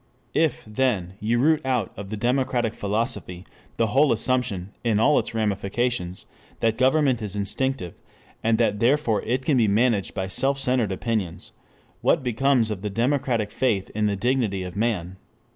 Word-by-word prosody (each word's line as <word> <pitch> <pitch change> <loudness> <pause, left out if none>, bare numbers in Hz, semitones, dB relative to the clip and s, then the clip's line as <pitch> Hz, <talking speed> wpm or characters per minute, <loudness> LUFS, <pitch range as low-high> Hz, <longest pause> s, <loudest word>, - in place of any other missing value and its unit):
If, 160 -4 +1
then, 105 -5 -1
you 115 +3 0
root 155 +5 +3
out 125 -6 -1
of 100 -1 -8
the 110 - -4
democratic 125 -1 0
philosophy 100 -4 -3 0.3
the 115 - +3
whole 140 +1 +5
assumption 115 -5 0
in 110 -3 +2
all 130 +6 +4
its - - -5
ramifications 105 -2 -1 0.3
that 115 0 0
government 130 -2 +3
is 105 -2 -3
instinctive, 105 0 -2 0.5
and 115 0 +3
that 105 -1 +1
therefore 120 -2 +2
it 130 +3 -2
can 145 - +3
be 115 -3 +4
managed 105 -1 +1
by 95 0 -2
self 135 +8 +1
centered 125 -6 +1
opinions, 95 -3 -3 0.5
what 160 - +2
becomes 125 -1 +2
of 100 -3 -4
the 105 - -3
democratic 115 -1 0
faith 105 -7 0
in 105 0 0
the 100 - 0
dignity 110 -3 0
of 90 0 -7
man? 100 -5 -1
115 Hz, 160 wpm, -24 LUFS, 100-130 Hz, 0.5 s, whole